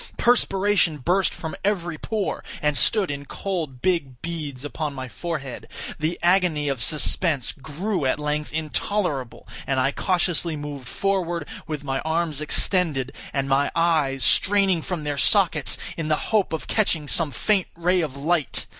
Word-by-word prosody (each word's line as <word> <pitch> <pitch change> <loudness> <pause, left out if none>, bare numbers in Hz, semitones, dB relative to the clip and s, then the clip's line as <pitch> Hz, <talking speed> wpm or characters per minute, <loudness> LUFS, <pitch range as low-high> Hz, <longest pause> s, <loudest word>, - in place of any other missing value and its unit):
Perspiration 200 -8 +3
burst 180 +8 +2
from 160 - -6
every 175 -5 0
pore, 215 -3 -2 0.2
and 150 -1 +1
stood 195 +2 +3
in 140 0 -5
cold 160 -8 -4
big 145 -9 0
beads 150 -5 -5
upon 145 0 -3
my 130 -1 -5
forehead. 140 -2 -5 0.3
The 160 +3 -1
agony 175 -5 +3
of 135 -3 -2
suspense 150 - +2
grew 160 +4 -3
at - - +1
length 150 0 -2
intolerable, 155 - -2 0.2
and 135 -1 +1
I 135 +2 +2
cautiously 175 -1 +1
moved 145 -4 -6
forward, 175 -4 -1 0.2
with 150 -3 -4
my 135 -1 -1
arms 160 -1 -1
extended, 150 -5 +1 0.2
and 135 -1 -1
my 140 +1 +2
eyes 155 -6 +2
straining 195 -3 +4
from 170 -1 -4
their 145 -1 -2
sockets, 175 -8 +3 0.2
in 160 -2 -3
the 155 -1 -1
hope 210 -6 +3
of 160 - -3
catching 165 -9 0
some 165 +1 0
faint 195 +6 +1
ray 180 +2 +2
of 145 -4 -4
light. 155 0 0
160 Hz, 155 wpm, -24 LUFS, 145-180 Hz, 0.3 s, straining